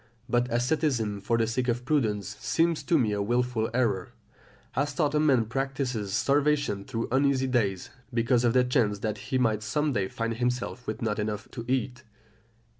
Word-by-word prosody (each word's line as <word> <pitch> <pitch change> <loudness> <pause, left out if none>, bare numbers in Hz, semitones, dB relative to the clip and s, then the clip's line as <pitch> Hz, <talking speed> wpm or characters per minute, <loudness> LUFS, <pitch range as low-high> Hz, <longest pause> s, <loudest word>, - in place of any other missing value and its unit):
But 120 0 +1
asceticism 120 -4 0
for 115 +3 +1
the 115 - +2
sake 125 +3 -1
of 120 0 -1
prudence 110 - 0
seems 165 -1 +1
to 160 +4 +2
me 115 -7 +2
a 100 -1 -1
wilful 120 +1 0
error, 115 -3 0 0.6
as 140 +1 0
though 155 - +2
a 150 +1 +1
man 135 -7 +3
practised 130 -3 -2
starvation 140 -2 +1
through 115 -3 -3
uneasy 135 0 +2
days, 105 -8 0 0.2
because 120 +1 +2
of 120 -1 +3
the 125 0 +5
chance 115 -4 +1
that 110 - -2
he 130 - +1
might 110 -4 +1
some 150 +7 0
day 100 -5 0
find 115 +3 -3
himself 125 0 -2
with 110 - -4
not 105 -1 -1
enough 105 0 -3
to 115 -3 -7
eat. 125 -1 -1
120 Hz, 180 wpm, -27 LUFS, 110-135 Hz, 0.6 s, the